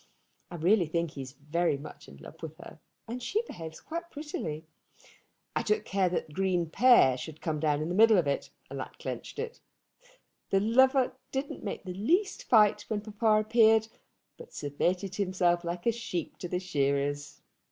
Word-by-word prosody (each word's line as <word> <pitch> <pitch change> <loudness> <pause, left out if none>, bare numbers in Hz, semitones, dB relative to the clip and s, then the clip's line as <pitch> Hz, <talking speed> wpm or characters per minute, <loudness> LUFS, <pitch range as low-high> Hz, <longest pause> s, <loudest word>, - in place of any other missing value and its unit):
I 175 - -7
really 175 +2 +3
think 170 0 -1
he 140 - -7
is 130 -1 -8
very 150 +2 0
much 150 +2 -11
in 70 - -13
love 70 - -13
with - - -7
her, - - -12 0.3
and 240 +2 -5
she 420 - 0
behaves 165 - -8
quite 340 +1 -6
prettily. 170 - -5 0.9
I - - +2
took 430 0 0
care 190 -2 +1
that 170 -3 -3
Green 185 -1 +1
père 235 - +6
should 155 +2 -8
come 155 -2 -2
down 150 -1 +1
in - - -3
the - - -1
middle 220 +2 +6
of 175 - +3
it, 140 0 -1 0.2
and - - -5
that - - -7
clenched - - -6
it. 470 +1 -5 0.9
The 195 - +3
lover 260 +5 +4 0.2
didn't 270 +1 -4
make 200 - -4
the 185 -1 -6
least 345 - 0
fight 215 -3 +5
when 215 -2 -2
papa 215 0 +2
appeared, 220 -1 +5 0.5
but 480 - -13
submitted 180 +6 -1
himself 180 -3 +1
like 175 +1 -4
a 235 - +4
sheep 215 -8 -5
to 180 - -4
the 180 +1 -1
shearers. 145 -4 -1
185 Hz, 180 wpm, -29 LUFS, 155-225 Hz, 0.9 s, père